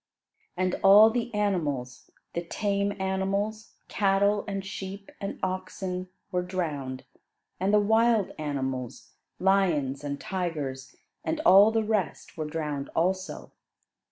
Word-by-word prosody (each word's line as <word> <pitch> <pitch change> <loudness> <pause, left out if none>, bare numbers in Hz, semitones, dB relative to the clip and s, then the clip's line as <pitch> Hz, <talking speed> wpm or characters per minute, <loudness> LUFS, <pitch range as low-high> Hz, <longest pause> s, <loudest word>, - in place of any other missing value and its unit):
And 185 0 +1
all 205 +3 +8
the 240 0 -2
animals, 155 - -2 0.2
the 170 - -1
tame 200 +3 -1
animals, 200 +3 -2
cattle, 200 0 +2
and 195 -1 -3
sheep, 195 +1 -7
and 195 - -4
oxen, 185 0 -3 0.2
were 180 -1 +1
drowned; 150 -8 -3 0.6
and 190 +2 +1
the 210 - +5
wild 220 0 +3
animals, 130 -4 -4 0.3
lions, 170 -9 +2
and 140 -1 -4
tigers, 150 -8 -4 0.3
and 320 - -1
all 200 -3 +8
the 225 0 +1
rest 210 -8 -2
were 155 - -3
drowned 150 -3 -3
also. 185 +3 -1
190 Hz, 120 wpm, -27 LUFS, 155-200 Hz, 0.6 s, all